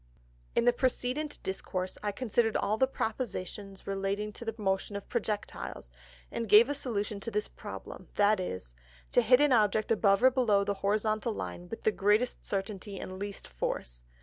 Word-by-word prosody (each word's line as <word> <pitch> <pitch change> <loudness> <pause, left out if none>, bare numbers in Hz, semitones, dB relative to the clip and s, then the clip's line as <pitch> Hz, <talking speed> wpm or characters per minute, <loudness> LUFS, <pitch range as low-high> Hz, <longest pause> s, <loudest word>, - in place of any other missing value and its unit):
In - - +3
the 245 - +6
precedent 260 +4 -1
Discourse, 185 -1 -3
I 210 - -1
considered 225 0 +1
all 205 +2 +1
the 260 +4 +3
Propositions 205 -5 -4
relating 200 +2 -2
to - - -9
the 225 -1 -3
Motion 195 -1 -1
of 200 - -5
Projectiles, 210 - -3 0.4
and 230 -2 -3
gave 220 +6 +8
a - - +1
Solution 215 -7 -2
to 215 - -4
this 210 -1 -1
Problem; - - -9
viz. 185 - +1 0.4
_To - - +6
hit 250 -1 +6
an 295 -1 +4
Object 215 -1 +3
above 200 -1 +4
or 260 - +8
below 225 -6 +3
the 200 - 0
Horizontal 215 +2 +1
Line 175 -3 -6
with 225 - -7
the 220 - +4
greatest 210 +5 +2
Certainty 195 0 -4
and 185 0 -6
least 200 0 -5
Force. - - -4
210 Hz, 170 wpm, -30 LUFS, 195-235 Hz, 0.4 s, gave